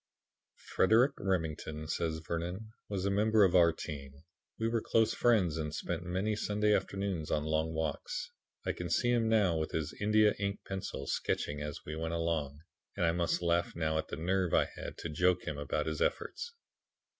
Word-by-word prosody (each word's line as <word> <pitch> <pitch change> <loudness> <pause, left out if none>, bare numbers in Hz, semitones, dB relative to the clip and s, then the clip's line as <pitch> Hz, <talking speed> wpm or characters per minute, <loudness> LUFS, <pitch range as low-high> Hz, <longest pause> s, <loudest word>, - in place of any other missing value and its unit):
"Frederic 115 +8 +3
Remington," 80 -4 -2
says 80 0 -1
Vernon, 90 +6 -3 0.2
"was 100 -2 -2
a 100 - +2
member 105 +1 +4
of 95 -1 +4
our 85 -2 +7
team. 70 -2 -8 0.3
We 115 - 0
were 115 0 +1
close 115 0 +2
friends 100 -10 +3
and 75 -1 -3
spent 85 -1 -3
many 95 +5 -1
Sunday 105 0 +1
afternoons 95 -6 -1
on 75 - +1
long 80 +1 0
walks. 365 - -3 0.3
I - - +1
can - - -5
see 120 -1 +2
him 115 -2 +2
now 100 -7 +3
with 80 - -3
his 80 -1 -2
India 105 0 +4
ink 100 0 -2
pencil 95 -1 -4
sketching 75 0 -1
as 75 -1 -6
we 75 - -5
went 80 +1 -2
along, 80 -4 -1 0.4
and 85 - +2
I 85 - +4
must 85 +1 0
laugh 85 0 +1
now 80 -1 0
at - - -3
the - - -5
nerve 90 +1 +1
I - - +3
had - - -7
to 85 - -5
joke 90 +3 +2
him 75 -1 -4
about 75 - -1
his 80 -1 -3
efforts. 475 -1 -2
85 Hz, 185 wpm, -32 LUFS, 80-105 Hz, 0.4 s, our